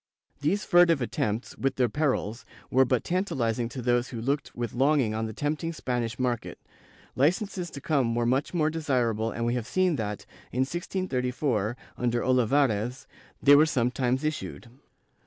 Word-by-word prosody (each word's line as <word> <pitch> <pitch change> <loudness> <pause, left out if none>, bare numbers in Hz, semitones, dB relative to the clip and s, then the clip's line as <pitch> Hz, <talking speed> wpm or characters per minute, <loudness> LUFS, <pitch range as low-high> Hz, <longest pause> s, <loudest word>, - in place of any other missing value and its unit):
^ - - -39
These 175 +8 0
furtive 175 -3 +5
attempts, 115 -2 -2
with 135 - 0
their 125 -2 +2
perils, 130 -4 -1 0.3
were 130 +1 +5
but 125 -1 +1
tantalizing 120 - -1
to 125 0 -6
those 120 0 +2
who 120 - -6
looked 135 +5 -2
with 120 -1 -3
longing 135 -3 +2
on 110 +1 -2
the - - -5
tempting 150 +7 -2
Spanish 120 -6 -2
market; 125 -3 -2 0.6
licences 175 - 0
to 140 - -8
come 130 -6 +1
were 120 0 +1
much 130 +4 +1
more 155 -3 +1
desirable 125 -8 0
and 115 +1 -3
we 120 - +1
have 120 -2 -3
seen 185 +2 +1
that, 105 -2 -4 0.3
in 125 - 0
1634, 130 - -1 0.2
under 120 -1 0
Olivares, 125 -1 +1 0.4
they 145 0 +8
were 155 +2 +6
sometimes 125 -1 0
issued. 150 -5 -4
130 Hz, 160 wpm, -27 LUFS, 120-150 Hz, 0.6 s, they